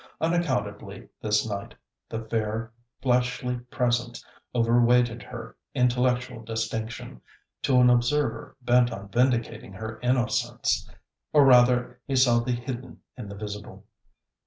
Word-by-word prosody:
Unaccountably 115 - -2
this 105 +1 +1
night, 100 -2 -5 0.3
the 115 0 -4
fair 110 0 -2 0.3
fleshly 125 0 +1
presence 120 -1 -1 0.3
over 120 0 +3
weighted 120 -1 +3
her - - -9 0.2
intellectual 125 -1 +1
distinction, 110 - -4 0.4
to 130 -2 +3
an 125 - +6
observer 125 0 +1
bent 120 0 +4
on 100 0 -7
vindicating 120 -4 0
her 110 +3 -7
innocence. 125 0 0 0.4
Or 145 -2 +7
rather, 125 -1 +4
he 135 - -1
saw 125 -2 +5
the 120 +2 -2
hidden 125 +1 -6
in 120 -6 -8
the 100 - -7
visible. 105 0 -8
120 Hz, 120 wpm, -26 LUFS, 110-125 Hz, 0.4 s, Or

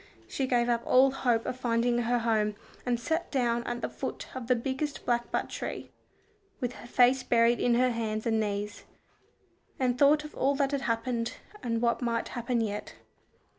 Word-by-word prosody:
She 270 - -2
gave 240 -2 +2
up 235 -1 +1
all 265 +1 +5
hope 240 -4 +1
of 250 - -3
finding 240 0 +1
her 240 +1 +1
home, 220 -3 +1 0.3
and 240 -1 +1
sat 320 +8 -1
down 240 -3 +1
at 240 0 -3
the - - -1
foot - - -6
of 255 -3 -5
the 250 - +4
biggest 265 +4 -3
blackbutt 240 -1 0
tree, - - -6 0.7
with 250 -3 -2
her 240 - -11
face 250 +2 +4
buried 235 0 +3
in 240 -1 +3
her 250 +1 +3
hands 220 -2 -2
and 225 -1 +2
knees, 205 -1 -3 0.9
and 250 -1 +1
thought 295 +1 +5
of 300 - -9
all 275 +2 +1
that 275 -1 +1
had 280 -1 -1
happened, 230 -1 -1 0.3
and 230 -1 -1
what 235 +1 +2
might 230 -1 -1
happen 240 -1 -1
yet. 210 -2 -4
240 Hz, 180 wpm, -29 LUFS, 230-255 Hz, 0.9 s, all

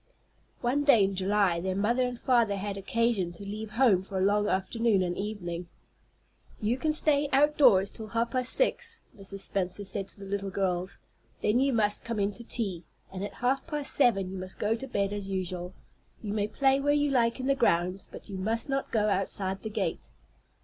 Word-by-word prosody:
One 265 +4 +1
day 265 -8 +6
in 195 0 +1
July 190 -2 +2
their 185 +2 -2
mother 225 +6 +1
and 250 -1 -1
father 235 -5 +3
had 200 0 -3
occasion 200 -2 0
to 175 - -10
leave 210 +2 -5
home 225 -6 +4
for 190 0 -6
a 185 - +2
long 205 +1 +2
afternoon 200 +1 +1
and 175 -1 -2
evening. 180 -4 -4 0.9
"You 220 +3 +1
can 310 - +1
stay 295 -2 +2
outdoors 270 -9 +5
till 220 - -7
half 230 +2 -1
past 255 -1 +1
six," 480 -2 0 0.2
Mrs. 195 -1 -5
Spenser 195 +1 -2
said 195 0 -1
to 200 - -13
her - - -7
little 200 0 -3
girls; 185 -1 -1 0.5
"then 215 +4 +3
you 275 +1 +3
must 210 -4 +1
come 230 -2 -3
in 200 0 +1
to 235 +4 -9
tea, 195 -8 -3 0.3
and 190 0 -4
at 205 - -6
half 260 +5 0
past 295 -3 -2
seven 210 -9 +3
you 190 - -5
must 185 0 -7
go 210 +2 +1
to 235 +4 -5
bed 200 -5 -1
as 200 -1 -4
usual. 180 -2 -3 0.5
You 205 -1 -3
may 210 -1 0
play 270 +5 +2
where 290 +1 +2
you 290 -1 +2
like 235 -2 +2
in 255 - -3
the 275 - +3
grounds, 185 -7 +1
but - - -10
you 195 -3 -6
must 225 +7 -1
not 275 0 -1
go 215 -2 +1
outside 195 -1 -1
the 220 - -5
gate." 180 - -3
210 Hz, 205 wpm, -29 LUFS, 190-245 Hz, 0.9 s, day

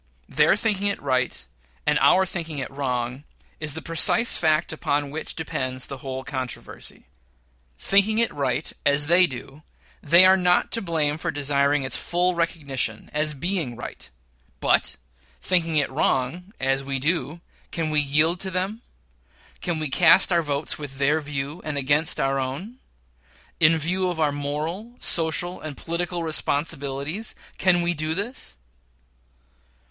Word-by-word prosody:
Their 150 +4 +3
thinking 205 -2 0
it 200 - -2
right 130 0 -1 0.4
and 150 0 +2
our 180 +8 +5
thinking 165 -4 -5
it 135 -1 -4
wrong 125 -1 -3 0.4
is 155 -2 0
the 160 - -5
precise 165 +8 +4
fact 155 0 +1
upon 145 -2 -1
which 160 +2 -6
depends 130 -5 -3
the 135 - -6
whole 130 0 -6
controversy. 130 -3 -6 0.7
Thinking 200 - +2
it 230 0 +2
right, 140 0 -1
as 145 +1 +4
they 175 +3 +5
do, 135 +2 -9 0.4
they 170 +5 +6
are 190 0 +7
not 180 -1 +2
to 230 - +3
blame 155 -4 -1
for 175 - -3
desiring 145 -1 +1
its 130 -1 +1
full 180 +1 +1
recognition, 140 -9 -2
as 150 0 +2
being 165 -5 -2
right; 120 - -9 0.5
but - - +2 0.4
thinking 165 - 0
it 145 -3 +1
wrong, 145 +7 -1
as 135 +1 0
we 135 0 -2
do, 155 +2 -1 0.3
can 160 -2 -2
we 150 - +3
yield 150 +5 +2
to 190 - -1
them? 190 +5 -3 0.8
Can 175 -3 -2
we 155 -1 -1
cast 175 +7 +5
our 170 - +3
votes 145 -1 -1
with 140 -3 -8
their 145 +3 +2
view, 145 +2 -5
and 150 -2 -4
against 145 +4 +2
our 135 0 +1
own? 150 - -5 0.8
In 165 0 +5
view 180 +4 -1
of 175 -2 -4
our 150 -2 +2
moral, 155 +11 -4
social, 165 0 +1
and 155 -3 -7
political 170 +1 -3
responsibilities, 150 +3 -1 0.2
can 175 -2 +3
we 175 0 +1
do 155 0 -2
this? 205 - -5
155 Hz, 150 wpm, -24 LUFS, 140-175 Hz, 0.8 s, are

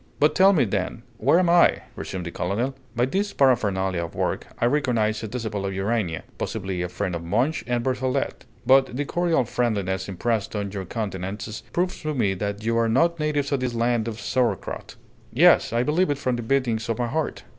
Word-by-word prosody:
"But 150 - +4
tell 195 +1 +6
me, 160 -10 +3
then, 100 +3 -3 0.2
where 145 +9 +4
I 170 0 +7
am?" - - -14
resumed 90 -2 -5
the 85 - -4
colonel. 110 +12 -1 0.2
"By 120 +1 +3
these 195 +10 -1
paraphernalia 95 -9 +2
of 85 - -7
work, - - -2
I - - +2
recognize 120 -6 +1
a 110 - -4
disciple 110 -3 -4
of 95 -1 -3
Urania; 95 -4 -1 0.2
possibly 95 -1 -3
a 90 - -2
friend 90 - -3
of 85 -1 -4
Monge 120 - 0
and 120 -1 0
Berthollet. 130 0 -1 0.2
But 130 0 +4
the 145 - -1
cordial 170 -2 +1
friendliness 100 -6 -1
impressed 110 +3 -1
on 100 -1 -2
your 95 -2 -5
countenances 105 +1 -4
proves 180 +1 -1
to 155 -1 -2
me 100 -7 +2
that 100 +2 -4
you 115 0 +2
are 115 0 +2
not 165 +8 +2
natives 150 -2 0
of 140 - +1
this 125 -2 -2
land 115 -1 +1
of 115 -1 -5
sauerkraut. 125 -1 -2 0.4
Yes, - - +5
I 120 +1 +1
believe 155 +5 +2
it 145 - 0
from 130 -3 -1
the 120 - -3
beatings 115 -2 0
of 115 - 0
my 120 - 0
heart. 155 +6 -2
115 Hz, 200 wpm, -24 LUFS, 100-135 Hz, 0.4 s, I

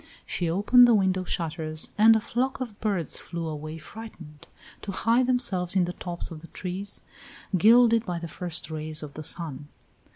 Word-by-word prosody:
She 175 -2 -2
opened 210 +8 +6
the 235 - +5
window 190 -2 +1
shutters 155 -2 -3
and 220 +1 +7
a - - +3
flock 250 +5 -2
of 235 -6 -6
birds 195 -8 -1
flew 170 -2 -5
away 155 +1 -6
frightened, 160 -5 -11 0.3
to 200 - -5
hide 230 +6 +2
themselves 200 -8 +1
in 185 -2 +4
the 175 - -4
tops 175 -2 -6
of 160 - -7
the 165 - -9
trees, 190 +4 -4 0.5
gilded 230 +4 +6
by 175 -6 -3
the 170 0 -5
first 170 -1 -6
rays 155 0 -3
of 145 -2 -8
the 155 - -7
sun. 150 -3 -3
180 Hz, 175 wpm, -26 LUFS, 160-220 Hz, 0.5 s, and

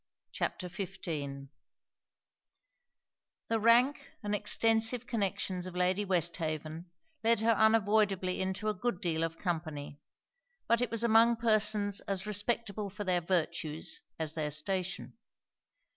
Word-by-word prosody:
] - - -57
CHAPTER 180 - -2
XV 160 -7 -5 2.0
The 225 0 +1
rank, 240 +6 +4
and 205 0 -2
extensive 225 +3 +2
connections 190 -5 -2
of 180 - -8
Lady 185 +3 +1
Westhaven, 165 -2 -2 0.3
led 230 -1 +3
her 230 +1 +4
unavoidably 210 -4 +3
into 190 +3 -2
a 215 - +2
good 210 -1 -2
deal 165 -2 0
of 165 0 -3
company; 155 -5 -4 0.7
but 235 +1 +3
it 245 - 0
was 230 0 -1
among 230 +1 +5
persons 215 -3 +2
as 195 -1 -2
respectable 210 0 -2
for 205 +2 -6
their 180 -2 +1
virtues 165 -3 -2 0.2
as 155 -1 -3
their 155 -2 -2
station. 185 +8 -3
195 Hz, 125 wpm, -32 LUFS, 170-220 Hz, 2.0 s, among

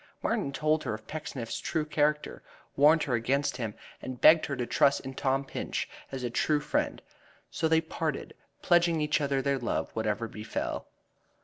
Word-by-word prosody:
Martin 140 - 0
told 155 +2 +1
her - - -2
of 110 - -12
Pecksniff's 135 -6 -5
true 160 -2 -1
character, 150 0 0 0.3
warned 150 +3 +5
her 130 - -2
against 130 +3 +1
him, 115 -4 -4 0.3
and 130 -1 -6
begged 160 0 +7
her 140 - -2
to 125 - -2
trust 140 +3 +3
in 135 0 -7
Tom 135 +1 0
Pinch - - -3 0.2
as 135 -2 -5
a 120 - -2
true 150 +5 +2
friend. 150 - -1 0.5
So 160 - 0
they 160 0 +4
parted, 160 -2 -3 0.3
pledging 175 -2 +4
each 150 0 +1
other 140 -2 0
their 140 -1 +1
love 120 - -2
whatever 110 0 -1
befell. 110 0 -4
140 Hz, 175 wpm, -29 LUFS, 125-155 Hz, 0.5 s, begged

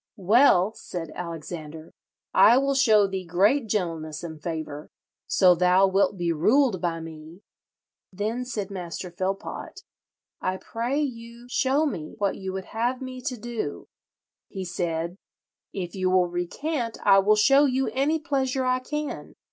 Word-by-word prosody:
'Well,' 205 -1 +4
said 165 -7 -7
Alexander, 160 -2 -7 0.4
'I 240 - +7
will 275 +1 +2
show 220 -7 +5
thee 190 -1 -3
great 205 +10 +2
gentleness 165 -7 -3
and 160 -2 -7
favour, 155 -2 -5 0.4
so 185 -2 +5
thou 180 +2 +4
wilt 195 +1 +2
be 170 -1 0
ruled 215 - +3
by 170 -2 -1
me.' 160 +3 -10 0.7
Then 215 +6 -2
said 210 -6 -4
Master 180 -1 -6
Philpot, 190 +3 -5 0.6
'I 185 0 -1
pray 240 +8 -2
you 235 -4 -5
show 275 +5 +2
me 160 - -4
what 200 -3 0
you 190 -1 -5
would 190 0 -5
have 240 +3 0
me 255 -1 -7
to 255 -2 -3
do.' 230 -9 -5 0.6
He 190 -1 -6
said, 170 0 -3 0.5
'If 180 -3 -5
you 185 -1 0
will 185 -1 +4
recant 230 - -3
I 195 - +7
will 210 +2 +4
show 275 +7 +5
you 265 -1 +1
any 285 +4 +1
pleasure 270 -4 -1
I 255 0 +2
can.' 300 +3 -5
195 Hz, 150 wpm, -25 LUFS, 175-255 Hz, 0.7 s, I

